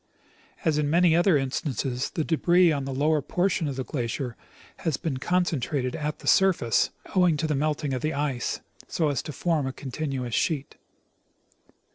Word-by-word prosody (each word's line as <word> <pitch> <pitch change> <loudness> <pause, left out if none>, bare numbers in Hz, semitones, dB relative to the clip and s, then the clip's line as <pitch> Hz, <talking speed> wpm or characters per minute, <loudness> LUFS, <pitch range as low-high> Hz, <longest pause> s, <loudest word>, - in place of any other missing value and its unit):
As 155 -2 +2
in 145 -1 0
many 170 +1 +4
other 175 -1 +4
instances, 130 -2 -2
the 160 - -2
debris 175 +2 +4
on 140 -3 -1
the 135 - -4
lower 150 +3 +2
portion 180 +3 0
of 140 - -3
the 130 - -3
glacier 125 -1 -3 0.4
has 155 -5 -1
been 155 -6 -3
concentrated 140 -5 0
at 150 0 -3
the - - -11
surface, 180 - +3 0.3
owing 180 -4 +4
to 160 - -1
the 155 - 0
melting 150 -1 -1
of 130 - -2
the 155 -1 -1
ice, 140 -4 -2 0.3
so 160 -3 0
as 140 -4 -1
to - - -7
form 155 -1 0
a - - -2
continuous 135 -3 -4
sheet. 145 +3 -1
150 Hz, 170 wpm, -26 LUFS, 135-165 Hz, 0.4 s, many